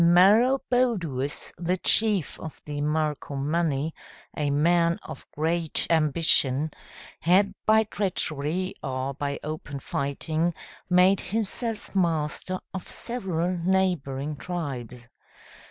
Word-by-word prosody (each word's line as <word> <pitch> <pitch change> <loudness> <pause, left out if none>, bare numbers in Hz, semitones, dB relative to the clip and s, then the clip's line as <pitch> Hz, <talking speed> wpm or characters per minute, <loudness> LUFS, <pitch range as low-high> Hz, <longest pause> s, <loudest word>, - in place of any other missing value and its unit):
Maroboduus, 200 - +3
the 180 +2 0
chief 210 -3 +1
of 160 - -8
the 145 -1 -4
Marcomanni, 150 0 0 0.4
a 150 -1 0
man 170 +3 +3
of - - -9
great 160 +1 0
ambition, 155 -2 +2 0.5
had 195 +4 +3
by 220 0 +6
treachery 185 -4 -2
or 130 0 -3
by 140 0 -3
open 150 -2 -5
fighting, 155 +5 -1 0.3
made 180 +2 +5
himself 225 +1 -2
master 170 +1 0
of 190 - -6
several 185 -7 -2
neighboring 165 -6 0
tribes. 130 -9 -5
165 Hz, 95 wpm, -26 LUFS, 145-185 Hz, 0.5 s, by